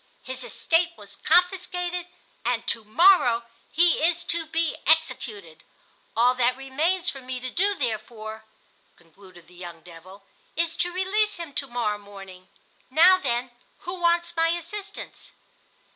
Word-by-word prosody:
His 260 0 -5
estate 335 +5 +1
was 200 -1 -7
confiscated, 360 0 +1 0.4
and 235 -1 -1
to 225 - 0
morrow 245 - +5 0.3
he 340 0 +4
is 340 +1 +2
to 335 -1 -1
be 330 0 0
executed. 255 - 0 0.5
All 245 +2 +5
that 250 0 +1
remains 325 +7 0
for 270 - -10
me 255 0 -5
to 255 0 -6
do, 400 +6 +2
therefore," 220 - -4 0.5
concluded 175 +1 -18
the 180 - -20
young 175 -2 -10
devil, 180 +4 -14 0.3
"is 335 0 0
to 355 - 0
release 405 +4 +1
him 335 -5 -7
to 275 - -3
morrow 230 -4 -2
morning. 195 -2 -12 0.4
Now, 350 +7 +6
then, 245 -4 -1 0.3
who 355 - -5
wants 340 0 +2
my 330 0 +3
assistance?" 385 +5 -6
270 Hz, 140 wpm, -25 LUFS, 220-345 Hz, 0.5 s, Now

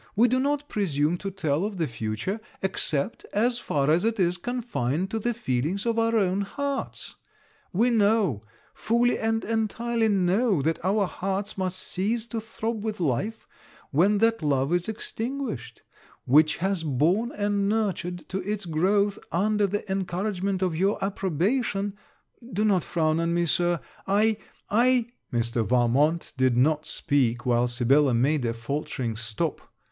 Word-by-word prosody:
We 230 +4 +5
do 255 +2 +2
not 290 +2 0
presume 165 - 0
to 195 - -4
tell 165 -4 -1
of 205 -1 -3
the 165 - +1
future, 115 - -3 0.2
except 160 -2 -1
as 240 +4 +2
far 145 - +1
as 165 +3 +3
it 225 -1 0
is 180 -1 +2
confined 190 - -2
to 225 - -1
the 240 +3 0
feelings 190 - -1
of 230 -1 +1
our 230 0 +2
own 195 -2 +2
hearts. 280 +7 -4 0.5
We 230 +6 +2
know, 205 - +2 0.3
fully 235 +2 +1
and 225 0 0
entirely 225 +1 0
know, 195 0 +2
that 160 +2 -1
our 200 +2 +2
hearts 195 +2 -3
must 185 -1 -2
cease 215 +6 -2
to 230 - -2
throb 220 0 -4
with 215 -2 -3
life, 180 - -1 0.4
when 190 +9 +4
that 225 0 +2
love 140 0 +1
is 175 +3 0
extinguished, 220 - -4 0.4
which 155 +4 +4
was 190 -3 0
born 165 - +1
and 205 -1 0
nurtured 190 -5 -2
to 190 - -2
its 205 +1 -3
growth, 195 +5 +1
under 205 +3 +2
the 205 +2 -3
encouragement 190 0 -1
of 180 -3 0
your 195 +5 +1
approbation 195 - 0 0.6
do 210 +2 +1
not 190 -5 +3
frown 160 -2 +1
on 170 0 0
me, 175 0 +2
Sir, 175 +1 +1 0.3
I 210 +2 +3 0.3
I 240 +2 +3
' - - -48
Mr. 115 -1 0
Valmont 125 - +2
did 130 -2 +2
not 150 +4 +2
speak 125 -4 +1
while 120 0 +3
Sibella 130 +2 +3
made 135 +4 +2
a 115 - 0
faultering 120 0 -3
stop. 115 -1 -3
190 Hz, 155 wpm, -26 LUFS, 150-220 Hz, 0.6 s, We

